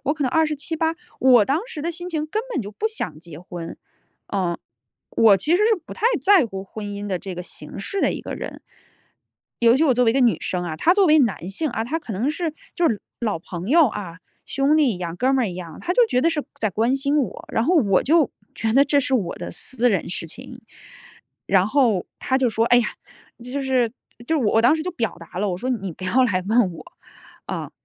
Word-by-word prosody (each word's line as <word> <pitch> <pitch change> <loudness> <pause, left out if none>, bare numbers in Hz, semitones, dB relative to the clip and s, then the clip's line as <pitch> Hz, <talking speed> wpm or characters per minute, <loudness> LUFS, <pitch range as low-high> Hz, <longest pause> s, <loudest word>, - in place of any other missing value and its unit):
我 290 - +1
可 295 -3 -2
能 250 - 0
27-28， 320 +1 0 0.3
我 250 -4 +6
当 275 +9 +1
时 320 -12 -7
的 335 - -1
心 350 +2 -7
情 310 -3 -2
根 430 +8 -2
本 275 - -1
就 205 - -8
不 435 - -1
想 435 - -5
结 160 -2 -11
婚。 175 -1 -8 0.6
嗯， 180 -4 0 0.5
我 215 -3 +5
其 195 - -4
实 - - +3
是 435 +1 +3
不 - - -9
太 450 - 0 0.2
在 385 -9 +5
乎 195 -3 -7
婚 205 +1 -7
姻 205 0 -5
的 185 -3 -2
这 190 0 -7
个 180 - -5
形 - - -10
式 395 - -3
的 - - +3
一 - - -5
个 - - -6
人。 - - -7 1.0
尤 235 +1 +5
其 310 - +3
我 275 - +4
作 250 +1 +3
为 225 - +4
一 - - -7
个 270 - +3
女 240 -3 +3
生 180 -1 -2
啊 165 -3 -4
他 345 - +3
作 400 0 +4
为 310 0 +6
男 215 -9 0
性 290 +11 -2
啊， 225 -1 -2
他 300 +8 -2
可 310 - -11
能 240 +10 0
是 325 -1 -3 0.2
就 345 -2 +2
是 215 - -2 0.2
老 215 -7 -1
朋 175 +3 -7
友 320 +1 +6
啊， 185 -5 -7 0.3
兄 275 +3 +2
弟 280 -7 +3
一 - - -8
样、 170 -2 -4
哥 255 +7 +1
们 260 -2 +2
儿 - - -1
一 180 - -6
样， 170 -3 -8
他 355 - -1
就 475 +3 +5
觉 250 - +1
得 330 - +4
是 300 -3 -1 0.2
在 215 - 0
关 230 +7 +1
心 280 +2 +1
我。 235 -9 -3
然 225 - +2
后 360 +7 +2
我 200 - +3
就 315 0 +3 0.2
觉 220 -1 -1
得 270 +4 +6
这 290 -1 +3
是 265 - -2
我 195 -9 0
的 - - -6
私 245 -2 -1
人 195 -6 -1
事 175 -1 -5
情。 245 +7 -11 0.8
然 190 -1 +3
后 225 -6 +2
他 260 - 0
就 260 -2 +2
说， 225 0 +1
哎 245 +1 +6
呀， 240 - +1 0.6
这 250 - -7
就 280 0 -2
是 255 -3 +1 0.4
就 320 - +1
是 260 - 0
我 210 - +1
我 225 - +4
当 250 +6 +5
时 315 - -3
就 365 - -3
表 225 - -2
达 170 +2 -9
了， 205 +1 0
我 175 - -3
说： 255 - -4
“你 195 -8 -3
不 185 - -14
要 250 +8 +3
来 185 -6 0
问 220 -4 +3
我 160 -2 -11 0.6
啊， - - -4
245 Hz, 265 characters per minute, -22 LUFS, 195-300 Hz, 1.0 s, 我